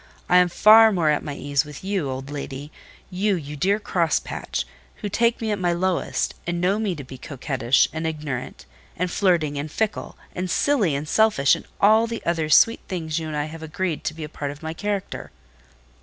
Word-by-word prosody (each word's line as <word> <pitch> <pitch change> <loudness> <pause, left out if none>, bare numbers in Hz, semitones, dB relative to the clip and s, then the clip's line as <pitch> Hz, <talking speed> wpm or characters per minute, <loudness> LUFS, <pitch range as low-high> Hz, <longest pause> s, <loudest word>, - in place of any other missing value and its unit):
I 180 - +5
am 180 0 +5
far 220 +5 +7
more 170 -6 +2
at 150 - 0
my 145 - -5
ease 140 -2 0
with 150 +2 -11
you, 190 -7 -1
old 130 +2 -5
lady—you, 150 +8 -4
you 150 -3 -6
dear 195 +8 +1
crosspatch—who 65 - -3
take 235 +3 +1
me 220 -2 -2
at 205 - -1
my 175 -1 +1
lowest, 185 +1 -1
and 175 0 -1
know 190 +4 +1
me 205 -5 -1
to 145 - -7
be 130 0 -11
coquettish, 130 -2 +1
and 160 +1 -2
ignorant, 150 -5 -5 0.3
and 180 +1 -1
flirting, 165 -8 +1
and 150 +1 -5
fickle, 220 +3 -2 0.2
and 180 0 -3
silly, 210 - +2
and 145 +2 -4
selfish, 210 -9 +4
and - - -3
all 220 +3 +5
the 230 0 -6
other 165 -2 0
sweet 230 +9 +5
things 165 -3 -3
you 160 - -5
and 155 -1 -4
I 145 - -1
have 160 +1 -9
agreed 160 0 -3
to 155 - -2
be 160 - -7
a - - -4
part 145 -1 -5
of 145 +2 -9
my 160 0 -4
character." 200 +2 -4
165 Hz, 200 wpm, -23 LUFS, 145-195 Hz, 0.3 s, far